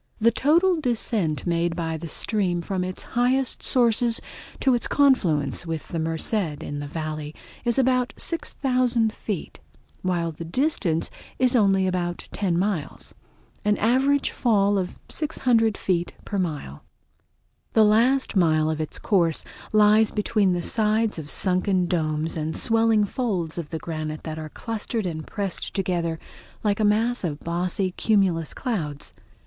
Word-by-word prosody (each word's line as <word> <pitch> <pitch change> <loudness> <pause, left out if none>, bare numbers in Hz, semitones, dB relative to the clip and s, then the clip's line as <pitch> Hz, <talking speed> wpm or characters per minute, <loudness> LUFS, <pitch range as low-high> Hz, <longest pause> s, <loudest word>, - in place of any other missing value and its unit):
The 230 +1 +4
total 330 +7 +3
descent 220 - 0
made 170 -1 0
by 165 -1 -2
the 165 +1 -6
stream 180 0 -1
from 185 +1 -2
its 185 0 -5
highest 250 +2 +1
sources 235 -1 +3 0.4
to 265 - +3
its 240 - +1
confluence 175 - +2
with 160 -2 -4
the 165 - -3
Merced 160 +5 -2 0.3
in 145 - -5
the 145 - -5
Valley 155 0 -5 0.3
is 235 +1 +1
about 255 -1 +2
6000 250 -8 0
feet, 205 -7 -5 0.4
while 175 -2 -1
the 160 +2 -8
distance 175 - 0 0.3
is 255 0 +3
only 195 -4 +4
about 175 -1 -2
ten 185 -4 -1
miles, 185 -5 -2 0.5
an 210 0 +2
average 265 +5 +2
fall 205 -4 +2
of 180 -1 -4
600 240 -8 +1
feet 175 -2 -1
per 200 - -2
mile. 150 - -4 0.9
The 220 -1 +6
last 235 +5 +3
mile 155 -4 +3
of 155 0 -2
its 155 - -4
course 170 -6 +1 0.3
lies 215 +1 +5
between 210 -3 +1
the 175 -1 -2
sides 215 -2 +1
of 150 -2 -8
sunken 185 +1 +3
domes 160 -2 0
and 160 0 -2
swelling 225 -2 +3
folds 190 -8 -2
of 155 -3 -6
the 160 - -3
granite 155 -1 -5
that 160 -1 -5
are 155 -1 -6
clustered 225 +3 -4
and 160 -3 -4
pressed 200 -4 -4
together 175 -4 -1 0.5
like 205 -1 +1
a - - +2
mass 225 +3 +2
of 155 -4 -3
bossy 180 +2 -1
cumulus 180 -6 +1
clouds. 160 - -3
195 Hz, 145 wpm, -24 LUFS, 165-230 Hz, 0.9 s, The